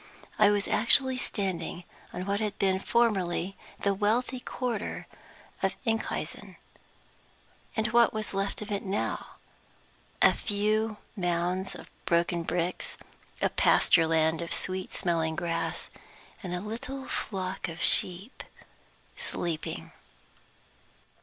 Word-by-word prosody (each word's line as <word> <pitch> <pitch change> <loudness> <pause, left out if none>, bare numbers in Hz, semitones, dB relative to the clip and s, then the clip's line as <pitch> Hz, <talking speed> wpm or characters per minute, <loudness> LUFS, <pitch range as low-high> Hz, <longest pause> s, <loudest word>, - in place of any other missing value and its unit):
I 210 -1 +8
was 205 -1 +2
actually 260 +4 +4
standing 180 -7 -2 0.3
on 180 - -4
what 200 +1 0
had 210 -2 -2
been 190 -1 +2
formerly 195 -5 +1 0.3
the 200 - +3
wealthy 230 +6 +1
quarter 245 -4 -3 0.6
of - - +1
Enkhuizen! 225 -1 -2 1.2
And 220 0 +2
what 235 -1 +5
was 215 -2 -3
left 195 +2 -1
of 210 - -8
it 200 - 0
now? 200 +1 -2 0.8
A - - +7
few 215 +1 0 0.2
mounds 180 0 0
of - - -11
broken 170 0 +2
bricks, 175 +1 -1 0.5
a - - +4
pasture 165 -2 +5
land 160 0 +2
of 170 - -2
sweet 185 0 -1
smelling 165 -3 0
grass, 165 0 -2 0.5
and 180 -3 -3
a 180 - -3
little 245 +6 -5
flock 190 -2 -3
of 165 0 -7
sheep 190 +8 +2 0.7
sleeping. 165 -3 -3
195 Hz, 115 wpm, -29 LUFS, 175-215 Hz, 1.2 s, I